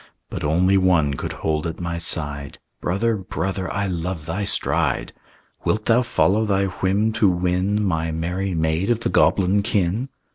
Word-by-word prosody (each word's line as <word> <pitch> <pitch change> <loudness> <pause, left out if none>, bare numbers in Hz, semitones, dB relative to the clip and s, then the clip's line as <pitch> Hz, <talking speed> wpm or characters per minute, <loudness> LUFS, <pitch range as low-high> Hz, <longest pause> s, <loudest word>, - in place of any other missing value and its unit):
But - - -5
only 90 +6 +3
one 85 -6 +3
could - - -4
hold 80 0 0
at 80 - -6
my 85 -1 -3
side: 75 -4 -2 0.2
"Brother, 110 +6 0
brother, 95 0 -3
I 100 0 -1
love 90 -3 -3
thy 90 +6 -2
stride. - - 0 0.5
"Wilt 110 0 0
thou 115 +2 +4
follow 110 -3 +2
thy 100 -2 +1
whim 95 +3 0
to 110 -3 +3
win 90 +4 0
My 80 -3 0
merry 90 +3 -2
maid 80 +5 0
of 120 -1 +1
the - - -1
goblin 100 +1 +3
kin?" 105 +4 0
95 Hz, 160 wpm, -22 LUFS, 85-100 Hz, 0.5 s, thou